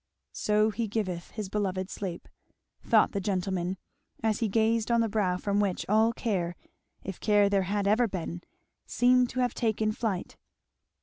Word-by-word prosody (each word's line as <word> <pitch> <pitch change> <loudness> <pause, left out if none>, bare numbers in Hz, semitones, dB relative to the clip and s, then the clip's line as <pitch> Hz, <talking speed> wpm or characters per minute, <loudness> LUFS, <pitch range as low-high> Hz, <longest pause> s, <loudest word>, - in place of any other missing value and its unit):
"So 215 +1 +2
he 230 +1 -2
giveth 190 -5 -3
his 215 -3 -5
beloved 190 -2 -2
sleep," 180 -4 -5 0.6
thought - - +4
the 200 - -2
gentleman, 185 -2 -1 0.5
as 220 0 +1
he 230 - +1
gazed 220 +2 +1
on 235 0 +3
the 225 - +2
brow 200 -4 0
from 200 +2 0
which 200 -3 0
all 220 +3 +4
care, 185 -7 -2 0.5
if 190 -2 -6
care 205 -2 +3
there 195 -2 +2
had 205 -1 0
ever 225 +4 +3
been, 175 -3 -5 0.5
seemed 250 0 +3
to 255 - -2
have 245 -2 +1
taken 220 -2 0
flight. 215 -5 -3
205 Hz, 165 wpm, -28 LUFS, 190-225 Hz, 0.6 s, thought